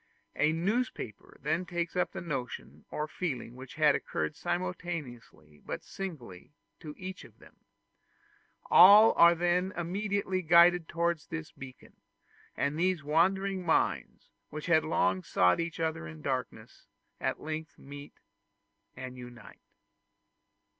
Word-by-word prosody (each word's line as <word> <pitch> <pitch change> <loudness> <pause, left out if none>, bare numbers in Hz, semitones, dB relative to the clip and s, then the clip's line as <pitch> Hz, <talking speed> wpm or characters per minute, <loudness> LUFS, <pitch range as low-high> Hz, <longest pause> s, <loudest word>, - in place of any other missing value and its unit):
A 150 +1 +2
newspaper 180 - -3
then 160 +5 0
takes 175 -1 -4
up 180 - 0
the - - -6
notion 135 -7 -6
or 150 - -3
the 155 - -17
feeling 130 -9 -4
which 130 0 -11
had 155 -2 +4
occurred 150 - -3
simultaneously, 155 - -5
but - - -6
singly, 150 - -8 0.3
to 150 -3 -9
each 185 +1 -7
of - - -17
them. - - -19 1.1
All 205 +5 +9
are 170 0 +6
then 175 +2 +1
immediately 190 +2 -2
guided 170 0 +5
towards 170 -2 -1
this 160 -1 -6
beacon; 130 -1 -13 0.6
and 145 +3 -1
these 180 -3 +1
wandering 190 +5 +1
minds, 165 - -1 0.2
which 155 0 -7
had 160 -3 +3
long 95 - +1
sought 90 - +2
each 165 0 -4
other 160 - -2
in 80 -1 -11
darkness, - - -5 0.3
at - - -2
length 155 +1 -6
meet 145 +1 -11 0.8
and 130 0 -8
unite. 120 -3 -12
160 Hz, 130 wpm, -30 LUFS, 140-180 Hz, 1.1 s, All